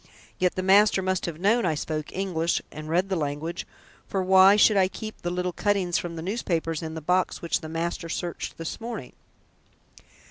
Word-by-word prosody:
Yet 180 -1 +2
the 185 - -2
master 195 0 +5
must 185 -1 -1
have 165 -2 -5
known 215 +6 +3
I 165 -4 +1
spoke 155 0 -4
English 175 -3 0
and 155 0 -8
read 180 +4 +1
the 190 - 0
language, 155 +2 -3 0.4
for 190 -1 -1
why 190 +1 +7
should 210 0 +5
I 190 -2 +4
keep 215 +3 -8
the 175 - -2
little 180 0 -2
cuttings 195 -4 +1
from 170 -1 -5
the 160 - -6
newspapers 170 -6 -2
in 160 -1 -5
the 160 - -5
box 180 +4 0
which 170 - 0
the 155 - -7
master 165 +1 -3
searched 175 0 -4
this 165 +6 -6
morning?" 225 - -6
180 Hz, 190 wpm, -26 LUFS, 165-195 Hz, 0.4 s, why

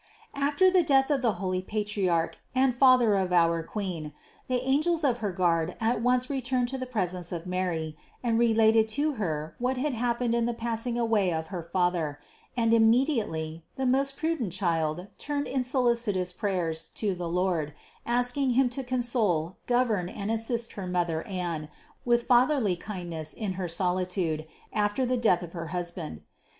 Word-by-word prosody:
672. 280 0 +1 0.2
After - - +5
the - - +4
death 275 -2 +3
of 280 -3 +2
the 235 -4 +2
holy 185 -2 -2
Patriarch 195 -5 -1 0.2
and 260 0 +3
father 250 -3 +5
of 190 -2 +1
our 170 -1 +3
Queen 165 -5 -5 0.3
the 255 -1 +1
angels 310 +4 +2
of 250 -4 +2
her 210 -3 -1
guard 170 -1 +1
at 225 0 +1
once 250 +1 +2
returned 255 -2 -1
to 265 0 -4
the 255 - -4
presence 185 -7 -2
of 170 -1 -4
Mary 175 -4 -2 0.3
and 230 -2 +2
related 225 -1 +4
to 290 +7 +1
Her 155 -3 -2
what 250 +1 0
had 280 +2 -1
hap 235 0 0
pened 240 -2 +1
in 235 0 +1
the 240 - -2
passing 235 +1 -2
away 220 -6 +2
of 160 -1 -3
her 180 -3 -4
father: 170 -3 -1 0.4
and 230 -1 +3
immediately 225 - +2
the 265 - -2
most 275 +2 +1
prudent 315 - -1
Child 170 -2 0
turned 290 -1 -2
in 260 0 -1
solicitous 235 -8 +1
prayers 175 -5 -1
to 205 -3 0
the 175 -1 -4
Lord, 175 -4 0 0.3
asking 245 +2 +1
Him 265 -2 +4
to 265 +2 -3
console, 235 -10 0
govern 230 -8 +1
and 205 +2 -4
assist 225 +1 -1
her 195 -3 -6
Mother 175 -3 0
Anne 175 -5 -3 0.4
with 240 -1 +3
fatherly 245 -5 +3
kindness 170 -5 -5
in 205 -4 -3
her 185 -1 -3
solitude 180 -2 -1 0.3
after 210 +4 +1
the 255 +1 +1
death 215 -7 +3
of 170 - -9
her 165 -2 -5
husband. 170 - -4
210 Hz, 170 wpm, -28 LUFS, 175-245 Hz, 0.4 s, After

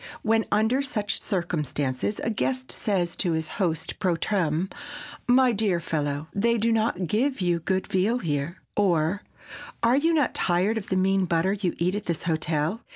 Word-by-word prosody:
When, 225 0 +2
under 220 +6 +3
such 215 -7 -2
circumstances, 155 - -2
a 225 - 0
guest 255 +4 -2
says 185 -5 -1
to 175 -4 +1
his 160 0 -1
host 165 -3 -1
pro 180 -3 +2
tem., 170 -2 0 0.6
"My 250 0 +5
dear 200 -5 +1
fellow, 150 -2 -2
they 235 +4 +2
do 230 +1 +1
not 220 -5 +1
give 255 - 0
you 175 -2 +1
good 190 +3 -1
veal 200 +6 +1
here!" 155 - -2 0.2
or, 180 -1 +2 0.6
"Are 235 +3 +4
you 325 +3 +3
not 290 -4 +2
tired 190 +5 +1
of 200 - -10
the 190 - 0
mean 190 0 +2
butter 170 +3 +1
you 195 -4 -2
eat 175 +2 +1
at 205 +1 -3
this 170 -2 -2
hotel?" 160 +4 0
190 Hz, 170 wpm, -26 LUFS, 165-220 Hz, 0.6 s, My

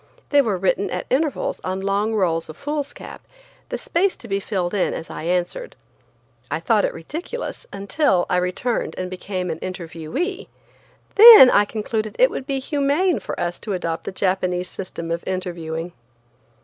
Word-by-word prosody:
They 285 -1 +6
were 215 -7 0
written 190 +2 0
at - - -4
intervals 285 +2 0
on 185 +1 -2
long 200 +3 0
rolls 165 -6 0
of 155 - -9
foolscap, 290 0 -5 0.5
the - - -3
space 370 +3 0
to 235 - -12
be 195 -1 0
filled 190 -3 -2
in 200 - 0
as 165 - -7
I - - -6
answered. 180 - -2 0.7
I - - -1
thought - - +2
it - - -2
ridiculous 480 +9 -6
until 200 - +1
I 180 - +1
returned 180 +7 -1
and 185 0 -4
became 185 -1 -4
an 160 - -5
interviewee. 185 - -4 0.7
Then 435 - +11
I 205 - +5
concluded 215 0 -3
it - - +5
would 265 - -5
be 275 -2 -1
humane 290 +6 +1
for - - -6
us 175 0 -2
to 210 - -4
adopt 165 -3 -3
the - - -3
Japanese 185 -1 -1
system 170 -3 -6
of 170 0 -2
interviewing. 175 -3 -4
195 Hz, 165 wpm, -22 LUFS, 180-280 Hz, 0.7 s, Then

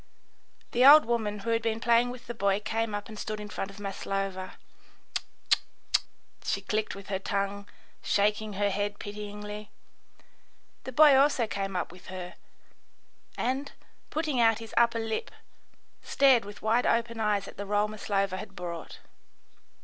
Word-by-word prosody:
The 245 - +3
old 295 +3 +10
woman 220 -3 -1
who 230 +3 -3
had 230 0 +2
been 225 0 -1
playing 235 +1 +3
with 245 -1 -8
the 240 - -5
boy 200 -3 +1
came 225 0 -2
up 205 - -5
and 215 -2 -9
stood 215 0 -4
in 210 0 -7
front 195 - -4
of 195 - -12
Maslova. 195 -1 -4 0.6
"Tz, - - +1 0.3
tz, - - +5 0.8
tz," - - -1
she - - -2
clicked 215 -1 -1
with 200 0 -11
her 190 -1 -1
tongue, 200 +1 -2 0.3
shaking 210 +1 +1
her 200 +1 +1
head 205 +1 -2
pityingly. 210 0 -7 1.2
The 260 - -4
boy 295 +2 +7
also 270 -3 +4
came 195 -2 -3
up 180 - -2
with 180 +1 -15
her, 185 -1 -6 1.0
and, 265 +3 -1 0.4
putting 305 -5 -1
out 225 -1 +5
his 225 -1 -10
upper 235 0 +4
lip, 225 -1 -2 0.7
stared 265 -6 +4
with 205 0 -10
wide 230 +3 +2
open 230 0 +1
eyes 205 -2 +1
at - - -11
the 200 - -5
roll 205 +1 +2
Maslova 200 -2 -1
had 195 0 -8
brought. 170 -2 -7
210 Hz, 165 wpm, -29 LUFS, 200-230 Hz, 1.2 s, old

